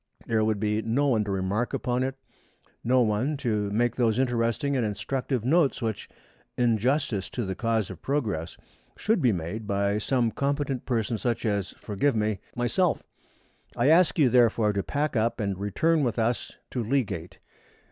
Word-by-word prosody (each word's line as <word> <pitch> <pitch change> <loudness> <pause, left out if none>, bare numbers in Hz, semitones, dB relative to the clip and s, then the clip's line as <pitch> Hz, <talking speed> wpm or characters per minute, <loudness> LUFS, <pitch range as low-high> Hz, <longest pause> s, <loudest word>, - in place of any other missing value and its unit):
There 110 -1 +1
would 110 -1 +1
be 105 +1 0
no 135 +6 +1
one 110 -4 +2
to 100 - -3
remark 95 +5 -1
upon 125 0 -1
it, 130 +1 -1 0.7
no 125 +2 +3
one 120 +7 +1
to 105 -6 -1
make 115 +3 +1
those 115 -3 +2
interesting 125 +2 0
and 125 - +1
instructive 115 +4 -2
notes 155 +1 +3
which, 110 -4 -3 0.5
in 120 -3 +2
justice 125 -5 0
to 120 - -3
the 95 - -2
cause 115 0 -1
of - - -10
progress, 110 - -2 0.4
should 215 -4 +1
be 125 -4 +4
made 95 +4 -4
by 100 +1 +1
some 120 0 +1
competent 140 -1 -2
person 115 -3 0
such 120 -2 -1
as 100 -3 -1
forgive 115 +6 0
me 105 -2 0 0.2
myself. 135 +9 +1 0.7
I 120 +4 +3
ask 165 -1 +5
you, 150 -5 +5
therefore, 115 -3 +3
to 100 - 0
pack 145 +6 -2
up 115 +2 +1
and 100 -3 -1
return 155 - +1
with 120 -3 -1
us 115 +1 -1
to 125 - -2
Leagate. 110 -9 -2
115 Hz, 170 wpm, -27 LUFS, 105-130 Hz, 0.7 s, ask